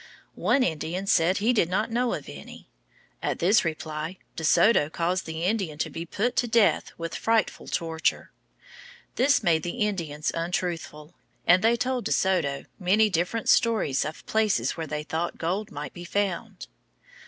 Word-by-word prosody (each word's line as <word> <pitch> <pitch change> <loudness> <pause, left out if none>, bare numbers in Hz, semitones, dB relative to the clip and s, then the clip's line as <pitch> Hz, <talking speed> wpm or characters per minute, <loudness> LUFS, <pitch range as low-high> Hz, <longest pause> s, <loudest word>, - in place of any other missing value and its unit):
One 275 - +2
Indian 170 +1 -2
said 185 -1 +3
he 225 +5 +2
did 180 -8 +2
not 215 +5 0
know 240 +1 +1
of - - -8
any. - - -11 0.5
At - - -1
this 195 +5 +4
reply 155 +1 -4 0.2
De 160 - -5
Soto 160 +1 +4
caused 175 +3 -1
the 160 +1 -4
Indian 185 -6 -1
to - - -2
be 165 +1 -6
put 230 +8 -1
to 245 - +2
death 230 -2 +3
with 165 0 -5
frightful 225 -1 0
torture. 165 -1 -1 0.8
This 270 -1 +3
made 165 -4 +3
the 195 +7 -1
Indians 160 -7 -3
untruthful, 165 -2 -3 0.3
and 180 +3 +5
they 230 +1 +4
told 250 0 -1
De - - -2
Soto 165 -8 +1
many 210 +3 +3
different 180 +6 -1
stories 220 - +3
of 155 +2 -7
places 220 -2 +1
where 165 -1 -5
they 150 0 -3
thought 160 +3 -3
gold 190 +6 -2
might 145 -1 -6
be 175 - -9
found. 195 -1 -2
180 Hz, 165 wpm, -26 LUFS, 160-215 Hz, 0.8 s, and